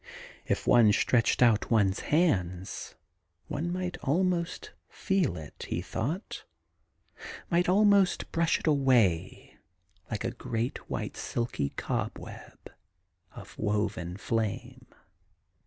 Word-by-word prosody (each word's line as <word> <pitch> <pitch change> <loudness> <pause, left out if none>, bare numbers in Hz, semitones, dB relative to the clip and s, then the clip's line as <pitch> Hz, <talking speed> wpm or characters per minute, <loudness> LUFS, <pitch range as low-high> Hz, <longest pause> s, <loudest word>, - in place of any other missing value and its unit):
If - - -1
one 115 -3 +6
stretched 120 +2 +3
out 115 -3 +3
one's 100 -4 +2
hands, 95 - 0 0.5
one 165 +4 -3
might 180 0 -3
almost 175 +3 -1 0.2
feel 185 - 0
it, 75 -3 -9
he - - -1
thought, 160 - -4 1.1
might 175 +1 +2
almost 200 -1 +3
brush 165 0 +1
it - - -8
away 125 - +1 0.5
like 110 -3 -3
a 115 - -1
great 120 0 -4
white - - -4
silky 115 -12 -2
cobweb - - -5 0.6
of - - -11
woven 105 -4 -1
flame. 115 +4 -3
120 Hz, 105 wpm, -29 LUFS, 105-170 Hz, 1.1 s, one